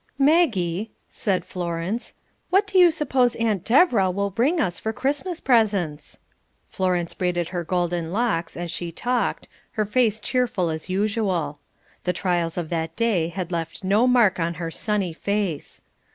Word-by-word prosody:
"Maggie," 225 - +2 0.2
said 190 -3 -1
Florence, 175 +5 -3 0.3
"what 390 +3 +4
do 390 -2 +2
you 355 -1 +8
suppose 265 -6 +1
Aunt 215 -6 0
Deborah 235 - +4
will 200 +2 -1
bring 265 - +1
us 175 -9 0
for 220 - -2
Christmas 290 +9 -2
presents?" 200 - +1 0.5
Florence 180 -2 -1
braided 175 -2 -1
her 175 -1 -3
golden 175 -1 -1
locks 200 -6 -1
as 175 -1 -4
she 170 0 -4
talked, 245 +8 -1 0.3
her 215 - 0
face 220 0 +2
cheerful 220 -8 0
as 160 +3 -5
usual. 190 -7 -1 0.4
The 180 - 0
trials 175 -2 -1
of 170 -3 -3
that 165 -1 -2
day 215 -8 +1
had 180 +1 -5
left 165 +1 -4
no 205 +6 +3
mark 230 -7 +4
on 170 0 -1
her 165 0 -4
sunny 200 -2 -1
face. 200 -4 -3
190 Hz, 150 wpm, -24 LUFS, 170-235 Hz, 0.5 s, you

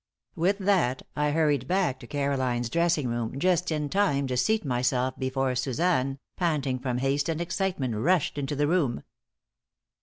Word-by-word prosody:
With 185 +4 +1
that 185 -11 +1
I 150 0 +1
hurried 145 -4 +1
back 180 -7 +1
to 120 - -11
Caroline's 130 -4 -1
dressing 170 -4 +1
room 120 +1 -3
just 180 +2 +1
in 150 -1 -1
time 145 -6 +1
to 130 -1 -2
seat 215 - +1
myself 125 0 0
before 130 0 0
Suzanne, 135 +2 0 0.2
panting 145 -7 0
from 125 -1 -2
haste 135 +4 0
and 160 -1 -1
excitement, 175 - -1
rushed 145 +6 +1
into 140 +1 -2
the 145 +1 +1
room. 150 -7 +1
140 Hz, 155 wpm, -27 LUFS, 130-170 Hz, 0.2 s, With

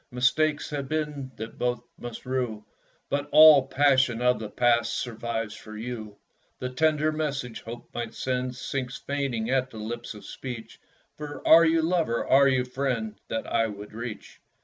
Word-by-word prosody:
Mistakes 145 +5 +1
have 140 -2 -4
been 150 -4 -3
that 110 0 -8
both 120 -1 -1 0.2
must 120 +1 -8
rue; 125 -5 -2 0.4
But 145 +1 -2
all 155 -2 +9
the 130 - -11
passion 130 -4 +4
of 125 0 +2
the 110 -2 -5
past 120 0 +2
Survives 115 -2 -3
for 110 0 -10
you. 110 -2 -6 0.4
The 125 - -4
tender 155 +3 +2
message 140 -6 -3
Hope 120 +1 -9
might 115 -1 -4
send 125 -1 -2
Sinks 130 -1 -4
fainting 135 -5 -2
at 130 -1 +1
the 115 - -11
lips 115 +1 -5
of 105 - -12
speech, 125 -4 -8 0.4
For, 150 -1 -7
are 165 +1 +9
you 165 0 +3
lover 165 -8 +1
are 140 +1 +6
you 130 -2 +2
friend, 125 -5 -3
That 115 - -3
I 115 - +1
would 105 -1 -9
reach? 115 0 -7
125 Hz, 170 wpm, -27 LUFS, 115-140 Hz, 0.4 s, all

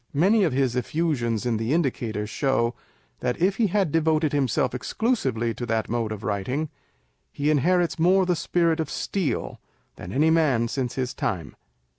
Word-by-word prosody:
Many 200 +8 +4
of 165 - +2
his 130 -2 +1
effusions 125 -5 -1
in 120 -2 +1
the 115 +5 -1
Indicator 120 -9 -1
show, 120 0 0 0.5
that 125 - -2
if 190 +4 +2
he 225 - +3
had 195 -4 +1
devoted 155 -1 +2
himself 135 -3 +1
exclusively 125 - -1
to 120 - -7
that 110 -2 -1
mode 115 -1 -1
of 105 -1 -6
writing, 125 +10 -2 0.6
he 145 +2 0
inherits 170 +4 +2
more 185 +3 +4
of - - -3
the 180 - +2
spirit 170 0 +1
of 160 -2 -2
Steele 190 -6 -2 0.4
than 85 - -8
any 155 +8 +3
man 140 -8 +3
since 125 0 -3
his 130 -1 -2
time. 110 - -3
140 Hz, 170 wpm, -25 LUFS, 120-165 Hz, 0.6 s, Many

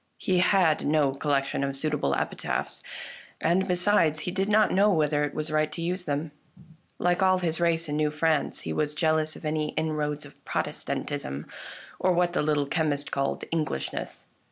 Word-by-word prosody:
He 185 -1 +1
had 180 -4 +3
no 150 -2 +3
collection 140 0 0
of 140 0 -1
suitable 150 - 0
epi - - -2
taphs, - - -3 0.6
and, 180 +4 +2
besides, 180 -4 +3
he 180 - -3
did 195 +2 -1
not 215 +1 +4
know 200 +3 +5
whether 150 -4 +2
it 145 - -3
was 155 0 -3
right 155 0 +1
to - - -7
use 180 +1 -2
them. 145 +1 -2 0.7
Like 175 +1 +1
all 185 0 +4
his 170 -3 -1
race 170 -1 +2
in 150 0 -2
New 150 0 +2
France 155 0 0
he - - -4
was 150 -1 -1
jealous 155 -1 +1
of - - -10
any 155 0 -1
inroads 150 -2 -2
of 145 - -16
Protestantism, 70 +3 -3 0.5
or 185 0 +3
what 175 0 +2
the - - +1
Little 150 -1 +1
Chemist 145 -1 -1
called 135 0 -1
" - - -32
Englishness." 155 - -3
155 Hz, 180 wpm, -27 LUFS, 150-175 Hz, 0.7 s, know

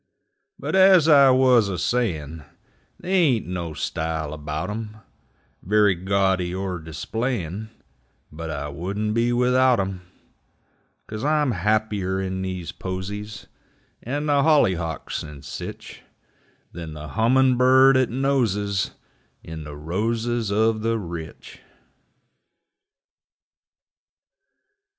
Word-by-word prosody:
But - - -5
as 190 -4 +6
I 140 -3 +7
wuz 130 -5 +4
a 95 - -3
sayin', 80 -10 -2 0.6
They 185 - -6
ain't 150 - +3
no 85 -3 -5
style 80 -1 -3
about 75 +4 -4
'em 110 0 -6 0.6
Very 105 +1 +3
gaudy 95 -1 0
er 95 -2 -3
displayin', 100 - -4 0.6
But 80 +1 -7
I 75 -1 -4
wouldn't 100 +8 -3
be 115 +2 +1
without 125 0 +3
'em, 95 -1 -3 1.0
'Cause 110 +1 -7
I'm 150 -2 +2
happier 105 -1 0
in 95 0 -3
these 95 -2 -4
posies, 100 +2 -6 0.6
And 145 +5 -3
the 145 -1 +3
hollyhawks 95 - +1
and 75 -2 -10
sich, - - -8 0.7
Than 80 -2 -8
the 75 0 -8
hummin' 125 - +3
bird 130 +2 +6
'at 130 -2 +3
noses 115 -7 0 0.5
In 80 -2 -8
the 75 -1 -8
roses 110 +8 -2
of 110 +1 +2
the 115 +1 0
rich. 85 -5 -8
105 Hz, 110 wpm, -23 LUFS, 85-125 Hz, 1.0 s, I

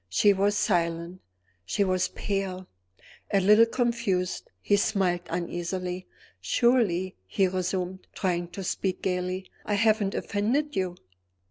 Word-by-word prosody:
She 200 - +4
was 200 +2 +1
silent; 170 -3 0 0.4
she 200 - 0
was 185 -1 +1
pale. 190 -2 -3 0.6
A 200 - +4
little 210 +4 +6
confused, 230 -7 -1
he 205 - +2
smiled 195 -4 +1
uneasily. 180 +1 -3 0.3
"Surely," 210 -7 +2
he 190 - +2
resumed, 185 0 -3
trying 175 -3 0
to 180 +3 -7
speak 185 +1 -2
gayly, 185 0 -2 0.2
"I 205 - 0
haven't 215 -2 +2
offended 255 +9 0
you?" 185 -2 -1
190 Hz, 120 wpm, -27 LUFS, 180-205 Hz, 0.6 s, little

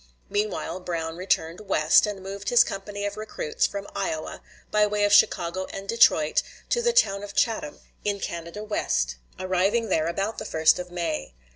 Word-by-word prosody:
Meanwhile 205 -2 -2
Brown 165 -2 -4
returned 170 -2 -1
West, 190 -2 +4
and 200 -2 -5
moved 195 +1 -5
his 245 -1 +7
company 200 +1 -5
of 205 +1 -4
recruits 455 - -1
from 200 0 -6
Iowa, 155 0 -3 0.3
by 210 0 +4
way 205 0 0
of 205 0 +3
Chicago 190 -3 +3
and 195 0 -7
Detroit, 200 -9 +4 0.3
to 480 - +2
the 475 0 +3
town 200 - +3
of 205 0 -8
Chatham, 220 -11 0 0.2
in 205 -1 -1
Canada 170 +4 -5
West, 60 - -1 0.2
arriving 190 +5 +1
there 160 0 +1
about 195 +6 -2
the - - -6
1st 160 +2 +3
of 180 0 -6
May. 165 - -3
195 Hz, 170 wpm, -25 LUFS, 170-210 Hz, 0.3 s, his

